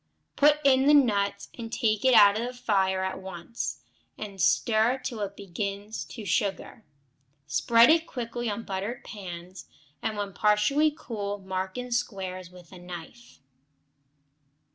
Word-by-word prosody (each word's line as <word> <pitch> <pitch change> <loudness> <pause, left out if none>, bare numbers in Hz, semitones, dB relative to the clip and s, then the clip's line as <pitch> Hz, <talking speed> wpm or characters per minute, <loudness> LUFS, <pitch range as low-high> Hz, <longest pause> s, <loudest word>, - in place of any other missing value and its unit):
Put 295 +1 +5
in 270 0 +4
the 295 - +7
nuts 200 -7 +2
and 230 -2 -7
take 215 -4 0
off 210 -6 +7
the 240 +3 -3
fire 190 -5 +1
at 190 0 -3
once, 190 +4 -6 0.4
and 200 -3 -6
stir 220 +5 +3
till 255 -3 -6
it 200 -1 -4
begins 200 +2 -5
to 220 -4 -9
sugar. 205 +1 -2 0.6
Spread 230 - +5
it 330 +1 +3
quickly 240 -1 -4
on 210 +2 -4
buttered 200 +5 -4
pans, 185 -2 -9 0.3
and 220 -1 -2
when 200 -1 -4
partly 210 +11 +3
cool 210 -9 -5
mark 190 +1 -4
in 250 0 -5
squares 190 -7 -3
with 180 -2 -16
a 185 - -11
knife. 180 +7 -10
210 Hz, 140 wpm, -27 LUFS, 190-240 Hz, 0.6 s, the